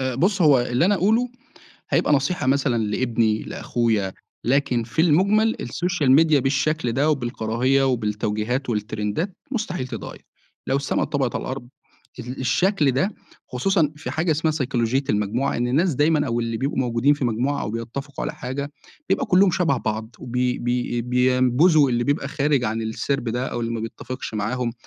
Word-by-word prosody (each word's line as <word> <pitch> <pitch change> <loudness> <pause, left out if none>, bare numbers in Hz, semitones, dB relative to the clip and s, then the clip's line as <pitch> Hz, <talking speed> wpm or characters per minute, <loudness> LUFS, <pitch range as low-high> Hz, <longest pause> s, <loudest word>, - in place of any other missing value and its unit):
آآ 130 -1 -1
بُص 185 - +1
هو 140 -5 +6
اللي 125 +5 +1
أنا 205 - +4
أقوله، 220 +6 +2 0.6
هيبقى - - +2
نصيحة 145 +1 0
مثلًا 130 -4 +2
لابني 110 0 0
لأخويا، 110 -5 -1 0.3
لكن 130 -1 +1
في 135 +8 -1
المُجمل 200 +7 +3
الSocial 175 +4 -1
Media 160 -2 +4
بالشكل 140 +1 0
ده، 140 +6 +1
وبالكراهية 125 0 0
وبالتوجيهات 110 +1 -1
والترندات 110 - -2
مستحيل 215 - -3
تتغير، - - -8 0.4
لو 135 - +1
السما 140 - -1
اتطبقت 135 -4 -1
على - - -2
الأرض، 130 -2 -6 0.5
ال 125 +2 -6
الشكل 150 +4 +2
ده 135 +10 +1 0.4
خصوصًا 155 +4 +1
في 155 - -5
حاجة 160 +1 0
اسمها 155 +1 +1
سيكولوجية 130 -2 0
المجموعة، 105 +5 0
إن 120 +1 0
الناس 160 +7 +2
دايمًا 150 +1 +2
أو 120 -1 -1
اللي 115 -1 -2
بيبقوا 135 +5 -2
موجودين 125 +3 +2
في 145 -3 -2
مجموعة 125 +5 0
أو 105 - -3
بيتفقوا 120 +5 -5
على - - -3
حاجة، 140 +3 -5 0.4
بيبقى - - +1
كُلّهم 190 -1 +4
شبه 170 -6 +1
بعض، 110 0 -4
وبي 125 0 -1
بي 120 0 -1
بينبذوا 130 +5 +3
اللي 120 -1 +1
بيبقى 145 +1 0
خارج 140 -2 +1
عن 110 +1 -1
السِرب 120 +5 -2
ده 125 +3 -2
أو 120 - -4
اللي 115 0 -2
ما 115 - -3
بيتفقش 120 +2 -6
معاهم 115 +3 -2
130 Hz, 165 wpm, -23 LUFS, 120-150 Hz, 0.6 s, هو